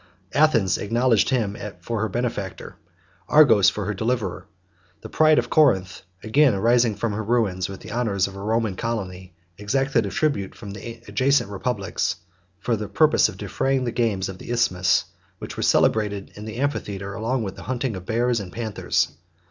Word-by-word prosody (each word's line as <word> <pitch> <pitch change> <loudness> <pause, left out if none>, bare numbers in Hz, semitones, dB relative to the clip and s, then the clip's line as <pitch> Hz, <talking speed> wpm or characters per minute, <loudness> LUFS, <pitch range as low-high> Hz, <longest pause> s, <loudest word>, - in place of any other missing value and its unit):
78 145 - +1
Athens 115 -12 +3
acknowledged 115 0 +2
him 110 -6 0 0.2
for 110 +5 -3
her 110 - 0
benefactor; 110 -4 -4 0.5
Argos, 135 -10 +6
for 105 - -4
her 105 - -2
deliverer. 105 -3 -2 0.5
The 110 - -9
pride 155 +3 +4
of - - 0
Corinth, 95 - +3 0.2
again 125 +1 +3
rising 115 +1 +3
from 105 +1 -2
her 110 +2 -3
ruins 100 -5 0
with 95 - -8
the - - -9
honors 105 -5 0
of 95 - -10
a 100 - -7
Roman 110 -1 0
colony, 95 -6 -5 0.2
exacted 120 +1 +1
a - - -3
tribute 120 -7 -1
from 105 -3 -9
the 115 +4 -9
adjacent 130 +1 +1
republics, 100 0 -2 0.4
for 115 +4 0
the 105 -1 -5
purpose - - +4
of - - -10
defraying 135 -1 -1
the 120 - -1
games 105 -6 0
of 95 -1 -8
the - - -10
Isthmus, 115 -7 +2 0.3
which - - -8
were - - -4
celebrated 105 -2 +1
in 105 - -9
the 110 0 -7
amphitheatre 100 -8 -3 0.2
with 100 -6 -4
the - - -10
hunting 125 -3 -1
of 95 0 -9
bears 120 +1 +1
and 95 -3 -7
panthers. 110 -1 -1
110 Hz, 175 wpm, -23 LUFS, 100-120 Hz, 0.5 s, Argos